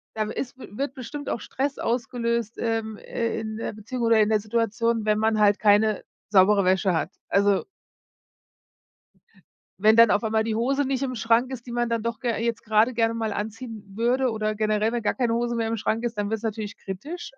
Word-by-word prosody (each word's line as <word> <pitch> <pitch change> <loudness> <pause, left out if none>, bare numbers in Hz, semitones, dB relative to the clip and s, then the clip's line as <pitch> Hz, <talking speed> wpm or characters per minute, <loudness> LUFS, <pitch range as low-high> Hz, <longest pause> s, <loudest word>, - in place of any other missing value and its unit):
da 215 -1 -1
w - - -5
ist 260 0 -5
wird 265 +3 -5
bestimmt 270 +3 -6
auch 220 - -2
Stress 280 +2 -3
ausgelöst, 235 -1 -1
ähm, 225 -2 -2
äh, 230 -1 -3
in 220 0 -5
der 225 - -4
Beziehung 235 +4 -5
oder 230 -1 +4
in 210 - +3
der 215 -1 +3
Situation, 230 +1 0
wenn 210 0 +2
man 220 0 +2
halt 205 -1 +5
keine 210 0 +3 0.3
saubere 200 0 +5
Wäsche 190 +1 +2
hat. 165 +1 -1 0.2
Also 200 0 +3 2.2
wenn 215 +2 +5
dann 230 -1 +7
auf 205 - +2
einmal 220 0 +1
die 220 -1 -2
Hose 270 +5 +1
nicht 265 -1 -1
im 255 -1 -2
Schrank 230 +3 +2
ist, 245 -3 -7
die 245 - -8
man 240 0 0
dann 230 -2 -1
doch 230 -1 -3
ge 240 -2 -1
jetzt 230 0 -2
grade 220 +3 +3
gerne 230 -1 +1
mal 220 -2 -2
anziehen 220 +1 -6
würde 245 +3 +2
oder 215 -1 -1
generell, 215 +1 +1
wenn 240 -1 -2
gar 210 - 0
keine 240 -3 +1
Hose 240 0 0
mehr 230 -1 0
im 225 0 -1
Schrank 220 +2 -1
ist, 235 -2 -3
dann 205 0 -1
wird's 220 0 -3
natürlich 220 -1 -4
kritisch. 285 - -7
225 Hz, 205 wpm, -25 LUFS, 215-235 Hz, 2.2 s, dann